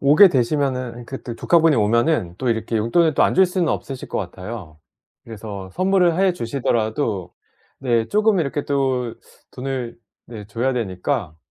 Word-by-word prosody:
오게 150 +8 +7
되시면은 130 -3 -1
그때 125 -2 -7
조카분이 165 +3 +3
오면은 115 - +1
또 130 - -2
이렇게 115 0 -1
용돈을 145 +9 +2
또 - - +3
안 - - +3
줄 190 +1 +6
수는 180 -1 0
없으실 135 -2 -4
것 - - -2
같아요. 95 -3 -7 0.5
그래서 105 -4 -8
선물을 185 - +2
해 195 -1 +4
주시더라도 115 - -1 0.5
네 120 -4 +1
쪼금 210 -2 +3
이렇게 145 -1 -2
또 130 -4 0 0.4
돈을 125 -3 -4 0.3
네 110 -4 -9
줘야 120 +5 -1
되니까 100 - -2
125 Hz, 320 characters per minute, -21 LUFS, 110-150 Hz, 0.5 s, 오게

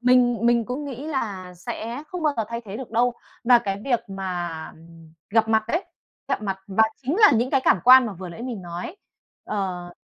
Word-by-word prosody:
mình 245 -1 +4
mình 235 -1 +3
cũng 255 +6 -4
nghĩ 275 0 -6
là 200 -11 -4
sẽ 230 +8 -6
không 360 -2 -5
bao 300 -2 +2
giờ 225 - 0
thay 235 0 -4
thế 200 -1 -7
được 255 +1 -8
đâu, 240 +2 +2 0.3
và 245 0 +7
cái 195 -2 -3
việc 245 -4 +1
mà, 175 -4 -4
ừm, 165 0 -17 0.2
gặp 225 0 +3
mặt 220 -1 +3
đấy, 335 +9 0 0.4
gặp - - -1
mặt 195 -2 -2
và 200 +2 +3 0.2
chính 275 +7 -1
là 425 -1 +7
những 240 +3 +1
cái 270 - +3
cảm - - +5
quan 255 0 +8
mà 215 - -4
vừa 185 0 -8
nãy 175 +7 -9
mình 240 -6 -5
nói, 175 - -6 0.5
ờ, 185 -4 -3
225 Hz, 215 wpm, -24 LUFS, 190-250 Hz, 0.5 s, quan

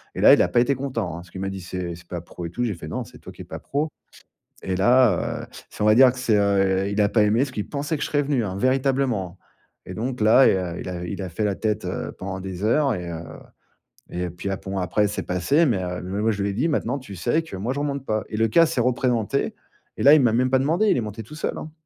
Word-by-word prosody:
et - - -3
là, - - +8
il - - +5
a - - +3
pas 120 - +2
été 140 +3 +3
content, 125 -8 -3
hein. - - -6
Parce 85 +1 -11
qu'il 95 - -8
m'a 95 - -2
dit: 95 -1 -6
«C'est 90 -1 -5
c'est 85 0 -16
pas 85 -2 -5
pro 85 0 -9
et - - -4
tout». 120 +8 -3
J'ai 115 -4 0
fait: 85 - -9
«Non, - - -3
c'est - - -15
toi - - -11
qui - - -12
es - - -9
pas - - -7
pro.» 150 +3 -2 0.8
et 95 - -1
là, 120 -1 +3
heu - - -14 0.2
si - - -6
on - - +3
va 105 0 +6
dire 130 -1 +8
que 130 - -10
c'est, 115 -4 +2
heu, 95 -1 +2
il 100 +1 -1
a 100 - +3
pas 110 - +3
aimé 105 +3 +2
parce 135 0 +1
qu'il 105 -5 -5
pensait 145 +2 -2
que - - -6
je - - 0
serais 145 -1 +1
venu, 135 -5 0
hein, 95 -1 -4
véritablement. 130 -7 0 0.5
Et - - -8
donc 125 +2 -4
là, 115 +5 +6
il - - +3
a 90 -2 -3
il - - -6
a 90 -1 -5
il 90 - -5
a 95 - -4
fait 90 +6 -3
la 100 - +1
tête, 110 -1 -1
heu, - - -4
pendant 95 0 -5
des 95 0 -6
heures 135 +5 +2
et, 90 -1 -5
heu, 85 0 -5 0.9
et 90 0 -3
puis, 90 +3 -6
heu, 95 - -2
bon, 95 +1 -4
après, 105 +3 +1
c'est 105 - -4
passé 90 - +2
mais, 100 - 0
heu, 90 0 -4 0.2
moi, 110 +1 +2
je 100 -1 -2
lui 100 - 0
ai - - -6
dit: 125 +11 0
«Maintenant, 140 -2 -1
tu 100 -6 -10
sais 120 - +1
que 160 - -9
moi, 115 +7 -2
je 140 - -4
remonte 140 -2 -3
pas». 110 -3 -1
Et 110 - -4
le 115 0 +3
cas 165 +10 +5
s'est 155 -7 0
représenté 125 0 0 0.4
et - - -2
là, 140 - +8
il 155 - +6
m'a 120 -3 +3
même 125 +2 +2
pas 130 - +4
demandé, 165 +10 +2
il - - +4
est - - 0
monté 110 +1 -6
tout 150 +8 -12
seul, - - -3
hein. 155 - -7
110 Hz, 295 wpm, -23 LUFS, 95-130 Hz, 0.9 s, là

